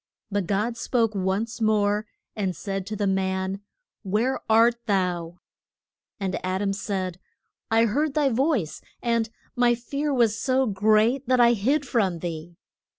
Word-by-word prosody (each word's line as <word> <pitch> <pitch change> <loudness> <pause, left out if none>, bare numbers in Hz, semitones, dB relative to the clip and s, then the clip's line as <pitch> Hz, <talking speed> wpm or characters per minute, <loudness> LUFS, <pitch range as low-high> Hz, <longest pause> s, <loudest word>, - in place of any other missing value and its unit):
But 200 -3 -1
God 215 +4 0
spoke 230 -3 +1
once 205 +5 -2
more, 210 -1 +2 0.3
and 190 -4 -2
said 195 +2 -4
to 215 - -4
the 205 0 -1
man, 190 0 -1 0.4
Where 220 +6 0
art 235 +2 +4
thou? 180 -4 -1 0.8
And 190 -2 -3
Ad 185 +2 -1
am 195 -1 0
said, 190 -3 -3 0.5
I 225 +1 +4
heard 280 +6 0
thy 295 -3 +3
voice, 245 - 0 0.2
and 230 -2 +1 0.3
my 245 -1 +3
fear 280 +5 -3
was 235 -5 +3
so 260 0 +2
great 215 +5 +2
that 255 0 +3
I 240 0 +6
hid 270 +7 0
from 195 -8 +1
thee. 170 0 -6
215 Hz, 150 wpm, -25 LUFS, 190-240 Hz, 0.8 s, I